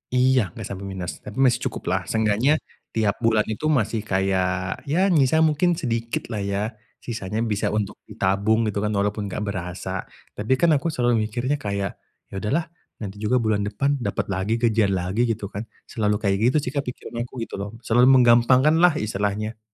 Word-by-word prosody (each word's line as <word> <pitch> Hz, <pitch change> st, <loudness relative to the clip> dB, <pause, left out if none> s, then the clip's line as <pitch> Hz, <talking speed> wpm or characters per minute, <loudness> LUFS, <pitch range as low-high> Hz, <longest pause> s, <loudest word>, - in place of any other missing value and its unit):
Iya 125 Hz, -7 st, +3 dB
enggak -, -, -6 dB
sampai 100 Hz, 0 st, -6 dB
minus, 95 Hz, -2 st, -5 dB
tapi 105 Hz, -, -10 dB
masih 120 Hz, -2 st, +4 dB
cukup -, -, -6 dB
lah, -, -, +1 dB
seenggaknya 110 Hz, +7 st, +2 dB, 0.4 s
tiap 110 Hz, -3 st, +1 dB
bulan 110 Hz, -2 st, +3 dB
itu 130 Hz, +8 st, -2 dB
masih 115 Hz, -7 st, +1 dB
kayak 95 Hz, -1 st, 0 dB
ya 185 Hz, +6 st, +2 dB
nyisa 160 Hz, +1 st, +4 dB
mungkin 160 Hz, +3 st, +3 dB
sedikit 115 Hz, -6 st, -3 dB
lah 105 Hz, -, -2 dB
ya, 100 Hz, 0 st, -1 dB, 0.4 s
sisanya 110 Hz, -1 st, -3 dB
bisa 105 Hz, -3 st, -1 dB
untuk 105 Hz, -2 st, -2 dB
ditabung 100 Hz, +4 st, +1 dB
gitu 100 Hz, -, -2 dB
kan 105 Hz, -, 0 dB
walaupun 100 Hz, +1 st, -1 dB
enggak 100 Hz, +2 st, -4 dB
berasa. 90 Hz, -4 st, -4 dB, 0.2 s
Tapi 110 Hz, +5 st, 0 dB
kan 165 Hz, +5 st, +3 dB
aku 150 Hz, +2 st, +2 dB
selalu 120 Hz, -6 st, +1 dB
mikirnya 125 Hz, +6 st, -1 dB
kayak 100 Hz, -5 st, -3 dB, 0.3 s
ya -, -, -14 dB
udahlah 155 Hz, -, -1 dB, 0.3 s
nanti 100 Hz, 0 st, -6 dB
juga 110 Hz, +4 st, +1 dB
bulan 110 Hz, -4 st, +1 dB
depan 140 Hz, +7 st, 0 dB
dapet 100 Hz, -5 st, -2 dB
lagi 95 Hz, +4 st, -1 dB
gajian 110 Hz, -4 st, +2 dB
lagi 95 Hz, +5 st, -1 dB
gitu 110 Hz, -3 st, -3 dB
kan. 105 Hz, +3 st, -6 dB, 0.2 s
Selalu 105 Hz, -3 st, +1 dB
kayak 100 Hz, -1 st, +2 dB
gitu 125 Hz, +7 st, +3 dB
sih 125 Hz, -, -3 dB
pikiran 140 Hz, -4 st, -5 dB
aku -, -, -29 dB
gitu -, -, -7 dB
loh. 100 Hz, +1 st, -4 dB
Selalu 120 Hz, +3 st, +4 dB
menggampangkan 130 Hz, +4 st, +5 dB
lah 175 Hz, -3 st, +5 dB
istilahnya. 105 Hz, 0 st, -2 dB
110 Hz, 180 wpm, -23 LUFS, 100-125 Hz, 0.4 s, menggampangkan